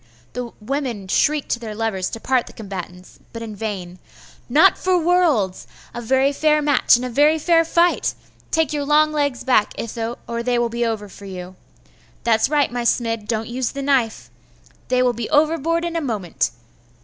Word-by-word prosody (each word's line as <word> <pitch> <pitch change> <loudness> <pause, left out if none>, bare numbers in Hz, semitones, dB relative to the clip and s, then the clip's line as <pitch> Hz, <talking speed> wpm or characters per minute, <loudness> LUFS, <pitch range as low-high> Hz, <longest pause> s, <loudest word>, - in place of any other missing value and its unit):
The 245 -1 -5
women 235 -4 -3
shrieked 295 +9 +1
to 240 - 0
their 220 -3 -7
lovers 210 -4 -1
to 225 - -6
part 255 +1 0
the - - -12
combatants, 185 -3 -8
but 230 0 -7
in 215 -2 -7
vain. 190 -4 -5 0.5
'Not 315 +9 +6
for 370 -1 +1
worlds! 320 - +1 0.3
A 240 - -5
very 265 +4 +2
fair 305 +1 +3
match 290 -5 +4
and 245 +1 -2
a - - -2
very 295 +6 +4
fair 330 +1 +3
fight! 340 +1 +2 0.3
Take 320 -2 +1
your 290 -1 -1
long 305 +2 +3
legs 285 -4 -1
back, 250 -5 +2
Itho, 230 +1 -4
or 235 0 -3
they 245 0 0
will 240 0 +1
be 235 +1 -2
over 220 -3 -2 0.2
you! 185 -1 -8 0.7
That's 225 +1 +2
right, 290 -3 +2
my 245 0 -2
Smid, 230 -2 0
don't 220 -1 -2
use 245 0 -3
the 275 0 -4
knife! 260 -5 0 0.6
They 255 0 +2
will 250 -1 +2
be 235 -1 -5
overboard 320 +2 +2
in 340 0 -4
a 330 - 0
moment! 210 - -1
245 Hz, 185 wpm, -21 LUFS, 220-295 Hz, 0.7 s, Not